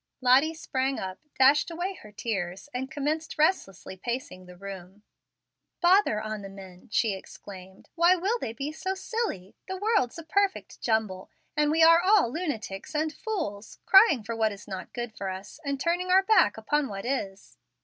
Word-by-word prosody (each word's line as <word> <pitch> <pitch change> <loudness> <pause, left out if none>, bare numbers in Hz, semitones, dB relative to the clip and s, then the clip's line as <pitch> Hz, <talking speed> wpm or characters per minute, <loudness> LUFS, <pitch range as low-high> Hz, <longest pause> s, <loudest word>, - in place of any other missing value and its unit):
Lottie 265 +6 +4
sprang 265 -3 -2
up, 185 -1 -6 0.2
dashed 280 +5 +5
away 350 +3 -3
her 210 - -14
tears, 195 -1 -4
and 260 +1 -3
commenced 310 +3 -3
restlessly 195 - 0
pacing 190 -3 -5
the 180 0 -13
room. 195 +1 -10 0.8
"Bother 355 - +4
on 215 -1 -5
the 195 - -8
men," 190 -1 -13
she 220 -2 +2
exclaimed. 190 0 -11
"Why 345 +2 +5
will 395 +7 -1
they 225 - -4
be 275 +6 -4
so 375 +5 -3
silly! 380 - -4
The 375 0 -4
world's 410 - +1
a 330 - -7
perfect 395 +4 -1
jumble, 215 -5 -1 0.3
and 300 0 +2
we 320 +2 +4
are 330 +1 +7
all 370 - +4
lunatics 230 - -4
and 310 +1 0
fools, 295 - -5
crying 385 - +6
for 230 +2 -4
what 220 -1 +1
is 200 +1 -11
not 190 -2 -7
good 240 -2 -5
for 195 - -4
us, 190 +8 -8
and 280 -2 -2
turning 350 +5 0
our 380 +1 +5
backs 435 - +4
upon 285 +6 0
what 195 0 -6
is. 205 -7 -4
260 Hz, 175 wpm, -27 LUFS, 200-335 Hz, 0.8 s, are